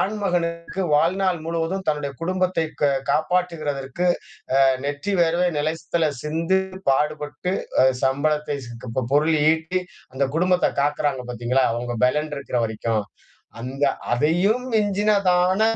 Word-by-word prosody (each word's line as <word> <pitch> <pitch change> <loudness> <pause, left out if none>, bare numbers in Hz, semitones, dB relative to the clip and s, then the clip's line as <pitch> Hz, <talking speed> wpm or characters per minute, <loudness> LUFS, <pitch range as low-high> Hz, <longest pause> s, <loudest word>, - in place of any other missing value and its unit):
ஆண்மகனுக்கு 180 -3 -1
வாழ்நாள் 180 +4 +2
முழுவதும் 165 +3 -2
தன்னுடைய 150 -2 0
குடும்பத்தை 185 -1 0 0.2
க 145 - +4 0.2
காப்பாற்றுகிறதற்கு, 155 -2 -1 0.6
அ - - +7 0.2
நெற்றி 145 +8 -2
வேர்வை 170 +1 +3
நிலத்தில 160 +1 0
சிந்து, 165 +5 +1 0.3
பாடுபட்டு 150 +4 0 0.3
அ - - +6 0.2
சம்பளத்தை, 145 +2 +1
ச - - -10 0.2
க - - -6
ப 130 - +1
பொருள் 155 +3 +4 0.2
ஈட்டி, 160 +3 0 0.3
அந்த 135 +1 +1
குடும்பத்த 180 +1 +3
காக்கிறாங்க 145 -2 0
பார்த்தீங்களா! 125 +2 +1
அவுங்க 120 +1 -3
பெலன் 150 +4 +1
இருக்கிற 140 -3 -2
வரைக்கும். 110 0 -1 0.6
அந்த 135 +3 -4 0.3
அதையும் 175 - +2
மிஞ்சினதான 200 -2 +2
160 Hz, 120 wpm, -23 LUFS, 140-180 Hz, 0.6 s, அ